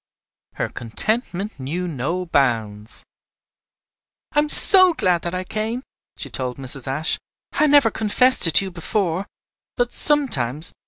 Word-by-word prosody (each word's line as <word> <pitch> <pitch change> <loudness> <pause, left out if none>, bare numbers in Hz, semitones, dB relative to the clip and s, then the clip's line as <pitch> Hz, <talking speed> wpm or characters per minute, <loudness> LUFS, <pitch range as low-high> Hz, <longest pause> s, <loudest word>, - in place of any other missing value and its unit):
Her - - -2
contentment 195 - -3
knew 165 +8 -4
no 170 +5 -3
bounds. 115 -8 -2 1.3
"I 295 - +1
am 300 0 0
so 370 +1 +7
glad 180 - 0
that 175 +1 -5
I 185 - -3
came," 220 +6 -4 0.3
she - - -3
told 125 -1 -5
Mrs. 135 -1 -6
Ashe. 150 +5 -1 0.3
"I 305 - +1
never 285 -6 +4
confessed 225 0 +3
it 165 - -1
to 195 - +5
you 190 - -7
before; 180 +1 -3 0.5
but 245 -1 -1
sometimes. 160 - +1
180 Hz, 140 wpm, -20 LUFS, 135-230 Hz, 1.3 s, so